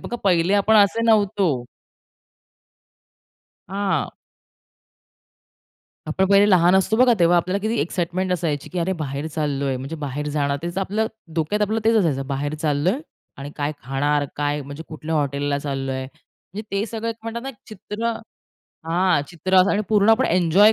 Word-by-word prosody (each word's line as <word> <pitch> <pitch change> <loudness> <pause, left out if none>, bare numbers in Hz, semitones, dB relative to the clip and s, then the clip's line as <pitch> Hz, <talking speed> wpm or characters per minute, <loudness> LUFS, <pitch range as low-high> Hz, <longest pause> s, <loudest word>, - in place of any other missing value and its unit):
बघा, 240 - -5
पहिले 180 0 +3
आपण 205 +2 +4
असे 205 +2 +4
नव्हतो. 200 - +2 2.0
हां. 195 +1 -1 2.0
आपण 190 - +1
पहिले 200 +1 +5
लहान 180 -1 +5
असतो 205 +3 +2
बघा, 250 0 +5
तेव्हा 175 0 +4
आपल्याला 180 +3 +1
किती 225 +2 0
एक्साईटमेंट 175 +3 -1
असायची 155 -5 -2
की 180 - -2
"अरे! 175 +3 0
बाहेर 140 +1 -3
चाललोय, 140 -4 -2
म्हणजे 135 +5 -6
बाहेर 150 0 -4
जाणार." 140 -1 0
तेच 175 +2 -3
आपलं 205 +3 0 0.3
डोक्यात, 165 +7 0
आपलं 215 +2 0
तेच 225 +1 +4
असायचं. 145 -10 +1
बाहेर 145 +2 -2
चाललोय 155 - +1 0.4
आणि 140 +1 -7
काय 145 +1 -1
खाणार, 145 +2 0
काय 145 0 -1
म्हणजे 145 +3 -8
कुठल्या 155 +1 -5
हॉटेलला 145 -1 0
चाललोय, 135 -2 -3
म्हणजे 165 +7 -12
ते 200 +1 0
सगळे 230 +1 -3
म्हणतात 230 +1 -5
ना, 270 - -5
एक 270 - -7
चित्र 215 +2 -4 0.7
हां, 175 0 +2
चित्र 185 +2 -1
असं 185 +2 +6
आणि 210 - +1
पूर्ण 210 0 +4
आपण 225 +4 +4
एन्जॉय 185 +5 +5
175 Hz, 155 wpm, -22 LUFS, 145-205 Hz, 2.0 s, असं